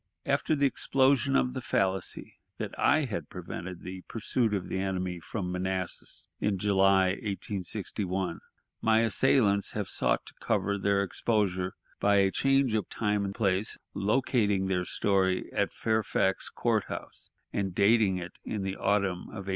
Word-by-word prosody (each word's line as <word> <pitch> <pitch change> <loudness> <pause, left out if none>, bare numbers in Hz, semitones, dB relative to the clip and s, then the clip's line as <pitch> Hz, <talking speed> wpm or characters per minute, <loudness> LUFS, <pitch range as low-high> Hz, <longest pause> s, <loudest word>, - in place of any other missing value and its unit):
After 155 - +1
the 140 -1 +2
explosion 135 0 +3
of 125 - +2
the 130 - -4
fallacy 95 -6 -1 0.2
that - - -4
I 155 0 +3
had 110 -6 -5
prevented 90 0 -7
the 95 0 -7
pursuit 115 0 0
of 100 -3 -2
the 95 - -2
enemy 95 -2 -2
from 90 +1 -4
Manassas 95 0 -4
in 105 -2 0
July, 95 -1 +4
1861, 95 -2 -3 0.4
my 110 0 +4
assailants 110 -3 +3
have 105 -3 -2
sought - - 0
to - - -9
cover 100 0 0
their 100 0 +2
exposure 95 -3 0 0.3
by 100 0 +3
a 95 -1 +4
change 135 -1 +2
of 110 -2 -1
time 105 -2 0
and 100 0 -4
place, 100 -1 0 0.2
locating 105 -1 +1
their 90 -2 0
story 95 -2 +1
at - - +1
Fairfax 110 -3 0
Court 110 -4 0
House, - - -8 0.2
and 95 -3 -2
dating 100 -2 +4
it 90 -1 -8
in 105 -3 -3
the 95 0 -3
autumn 100 -3 0
of 100 -3 -7
1861. - - -6
100 Hz, 155 wpm, -29 LUFS, 95-110 Hz, 0.4 s, July